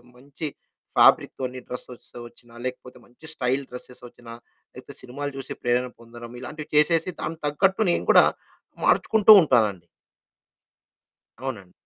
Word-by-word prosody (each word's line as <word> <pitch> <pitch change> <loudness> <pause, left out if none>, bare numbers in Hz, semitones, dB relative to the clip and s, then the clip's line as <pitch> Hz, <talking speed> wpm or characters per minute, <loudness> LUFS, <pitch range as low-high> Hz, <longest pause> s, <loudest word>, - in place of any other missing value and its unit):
మంచి 140 +5 -7 0.5
ఫ్యాబ్రిక్‌తోని 130 -1 +3
డ్రెస్సెస్ 125 0 -10 0.2
వచ్చినా 120 0 -20
లేకపోతే 125 0 -7
మంచి 125 +6 -19
స్టైల్ 130 0 -1
డ్రెస్సెస్ 125 0 -11
వచ్చినా 120 -1 -13 0.4
లేకపోతే - - -12
సినిమాలు 145 +3 -6
చూసే 135 - -6
ప్రేరణ 125 +1 0
పొందడం 120 0 -12
ఇలాంటివి 150 +3 -9
చేసేసి 165 +3 +3
దానికి 165 0 -5
తగ్గట్టు 190 +6 +1
నేను - - -1
కూడా - - +7 0.6
మార్చుకుంటూ 220 -1 +4
ఉంటానండి. 105 - +1 1.5
అవునండి. 105 -9 -6
125 Hz, 115 wpm, -24 LUFS, 120-150 Hz, 1.5 s, కూడా